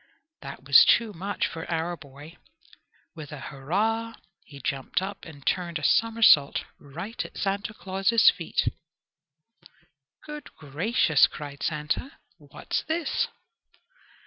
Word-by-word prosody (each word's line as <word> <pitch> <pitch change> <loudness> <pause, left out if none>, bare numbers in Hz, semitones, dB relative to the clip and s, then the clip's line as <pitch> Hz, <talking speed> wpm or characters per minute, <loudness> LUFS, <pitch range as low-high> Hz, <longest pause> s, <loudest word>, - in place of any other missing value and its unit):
That - - -9
was - - +8
too 230 -3 +3
much 195 +4 -2
for 165 0 -6
our 170 +1 -1
boy. 145 +1 -13 0.8
With 155 -3 -9
a 150 - -7
"hurrah" 215 +13 -2 0.3
he 140 -2 -13
jumped 135 0 -2
up 195 +1 -6
and 145 -5 -13
turned 175 -2 0
a 150 - -8
somersault 225 -9 +4 0.2
right 170 +11 -6
at - - -11
Santa 200 +2 -2
Claus's 195 +5 +4
feet. 170 -4 -2 1.6
"Good 300 -1 -9
gracious!" 160 - +2
cried 140 -2 -9
Santa, 150 - -2 0.2
"what's - - -4
this?" 325 +1 -1
170 Hz, 120 wpm, -26 LUFS, 150-215 Hz, 1.6 s, was